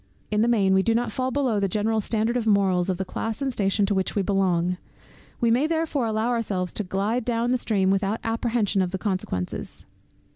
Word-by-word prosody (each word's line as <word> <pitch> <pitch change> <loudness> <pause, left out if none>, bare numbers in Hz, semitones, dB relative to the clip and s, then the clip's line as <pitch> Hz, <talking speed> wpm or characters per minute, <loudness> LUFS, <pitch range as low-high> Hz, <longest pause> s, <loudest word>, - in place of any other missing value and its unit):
In 210 0 +2
the 230 - +3
main 200 -5 +3
we 190 - +4
do 225 +3 +1
not 235 -1 0
fall 255 +3 -1
below 255 -5 0
the 200 - +1
general 215 +3 0
standard 225 +2 0
of 235 -2 -1
morals, 190 -3 +3
of 185 - 0
the 190 - -3
class 225 +5 -4
and 270 -2 -1
station 200 -1 +1
to 205 - 0
which 190 -1 -1
we 200 - +1
belong, 180 -2 +1 0.6
we 235 -1 +2
may 260 +6 +3
therefore 320 -6 0
allow 220 +2 0
ourselves 205 -7 -1
to 210 - -2
glide 205 +6 -1
down 235 +1 0
the 255 - +3
stream 195 -5 +1
without 195 +2 0
apprehension 225 -3 0
of 185 - 0
the 190 - -3
consequences. 185 - -3
215 Hz, 215 wpm, -25 LUFS, 190-235 Hz, 0.6 s, we